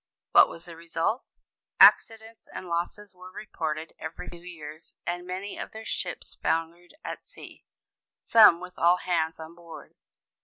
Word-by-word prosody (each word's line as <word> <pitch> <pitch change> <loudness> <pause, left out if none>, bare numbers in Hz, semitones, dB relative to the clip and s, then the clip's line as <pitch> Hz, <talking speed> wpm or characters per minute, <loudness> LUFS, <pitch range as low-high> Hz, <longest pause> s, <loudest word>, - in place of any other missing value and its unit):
What - - +7
was 165 - -10
the 170 - -10
result? 170 +7 -2 0.5
Accidents 225 0 +5
and 185 - -8
losses 175 +4 -4
were 185 0 -13
reported 160 -7 -5
every 160 +2 -7
few 175 - -11
days, 160 -3 -11
and 175 +1 -4
many 190 +3 -6
of - - -7
their 220 0 -9
ships - - -5
foundered 170 - -2
at - - -6
sea, - - -14 0.6
some 210 -7 +7
with 180 0 -11
all 175 +2 +5
hands 165 -3 -1
on 160 +1 -9
board. 170 -1 -13
175 Hz, 150 wpm, -27 LUFS, 165-185 Hz, 0.6 s, What